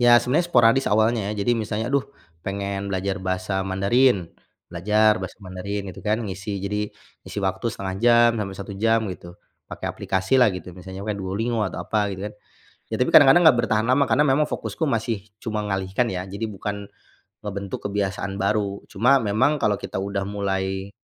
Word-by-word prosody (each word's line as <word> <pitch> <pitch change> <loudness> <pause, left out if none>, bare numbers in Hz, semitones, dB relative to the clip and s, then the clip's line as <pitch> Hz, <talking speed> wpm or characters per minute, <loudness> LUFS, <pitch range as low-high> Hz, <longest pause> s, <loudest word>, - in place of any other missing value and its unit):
Ya 120 0 +7
sebenarnya 160 +8 +1
sporadis 120 -1 +4
awalnya 110 -1 +2
ya. - - -2
Jadi 120 - +3
misalnya 110 0 -2
aduh 140 -1 +2 0.4
pengen 100 0 -3
belajar 95 +1 -2
bahasa 95 +1 -2
Mandarin, 100 0 +2 0.4
belajar 105 +3 +3
bahasa 95 - -6
Mandarin 95 +2 -4
gitu 95 - -11
kan, 105 +2 0
ngisi 100 +1 -5
jadi, 105 +1 -2 0.3
ngisi - - -7
waktu 95 +3 -1
1/2 95 -4 -4
jam 120 0 +6
sampai 100 -2 -4
1 100 +1 -7
jam 115 +3 +2
gitu, 85 -1 -12 0.3
pakai - - -6
aplikasilah 105 +6 +2
gitu 90 0 -9
misalnya 95 +2 -9
pakai 105 -1 -3
Duolingo 110 +5 -2
atau 90 - -6
apa 105 0 0
gitu 95 -1 -6
kan. 105 - -8 0.6
Ya - - +1
tapi 125 - +2
kadang-kadang 145 +4 +8
nggak 120 - +4
bertahan 110 -1 +1
lama 140 +2 +4
karena 145 - +3
memang 145 +3 +3
fokusku 160 - -3
masih 115 -5 -1 0.2
cuma 105 -2 -2
ngalihkan 95 +4 0
ya, 90 - -3
jadi 100 +3 -3
bukan 100 -1 -5 0.6
ngebentuk 100 -1 -5
kebiasaan 100 -1 -2
baru. 100 0 0
Cuma 125 +5 +3
memang 130 +8 +1
kalau 105 -1 +2
kita - - -4
udah 100 0 -2
mulai 95 -1 -2
100 Hz, 175 wpm, -23 LUFS, 95-115 Hz, 0.6 s, kadang-kadang